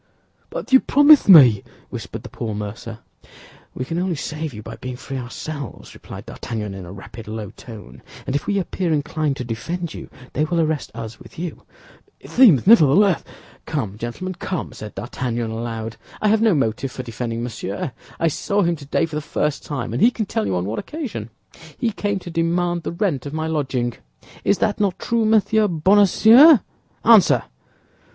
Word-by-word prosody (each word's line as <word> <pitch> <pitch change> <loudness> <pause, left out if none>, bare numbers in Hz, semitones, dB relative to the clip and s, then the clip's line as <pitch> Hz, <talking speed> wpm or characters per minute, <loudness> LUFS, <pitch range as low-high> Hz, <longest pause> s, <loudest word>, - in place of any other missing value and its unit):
"But - - -6
you 265 - +9
promised 290 -2 +5
me—" 130 - +8 0.3
whispered - - -7
the - - -9
poor 110 -2 -5
mercer. 105 +2 -7 0.7
"We 130 - -3
can 165 +5 -3
only 180 -1 -1
save 155 +1 -4
you 105 -3 -9
by - - -8
being 130 -1 -6
free 135 +1 -6
ourselves," 140 +2 -7
replied - - -10
D'Artagnan, 105 -4 -5
in 95 -2 -8
a - - -9
rapid, 100 +3 -10
low 110 -2 -6
tone; 105 - -12 0.2
"and 135 - -2
if 145 - -2
we 200 - +1
appear 185 -2 -2
inclined 150 -1 -1
to - - -4
defend 165 +9 -4
you, - - -9 0.2
they 150 - +1
will 170 +2 0
arrest 155 -2 0
us 115 -1 -7
with - - -15
you." 170 0 -6 0.5
"It - - -14
seems, 215 - +6
nevertheless—" 190 -2 +5 0.4
"Come, 125 -11 -3
gentlemen, 120 +12 -5
come!" 185 -3 -4
said 105 -1 -9
D'Artagnan, 120 -1 -3
aloud; 115 -1 -5 0.2
"I 215 - +2
have 220 +1 +3
no 220 -6 +4
motive 130 0 -1
for 130 - -6
defending 115 0 -4
Monsieur. 115 0 -4 0.3
I 165 - +2
saw 200 +6 0
him 170 0 +1
today 145 +2 -1
for 160 - -12
the 150 - -2
first 150 0 -2
time, 130 -6 -4
and 120 - -2
he 235 - +7
can 230 -3 -3
tell 110 - -2
you 95 - -1
on 90 0 -1
what 105 +3 -3
occasion; 240 - -6 0.5
he 235 - 0
came 205 -1 -2
to 175 - -8
demand 170 +1 0
the - - -4
rent 170 - -1
of 145 - -7
my 160 0 -2
lodging. 135 -6 -1 0.5
Is 200 - +2
that 210 -2 0
not 195 -3 +1
true, 230 -1 0
Monsieur 215 0 +3
Bonacieux? 205 - +6 0.5
Answer!" 220 -5 +6
150 Hz, 185 wpm, -21 LUFS, 115-185 Hz, 0.7 s, you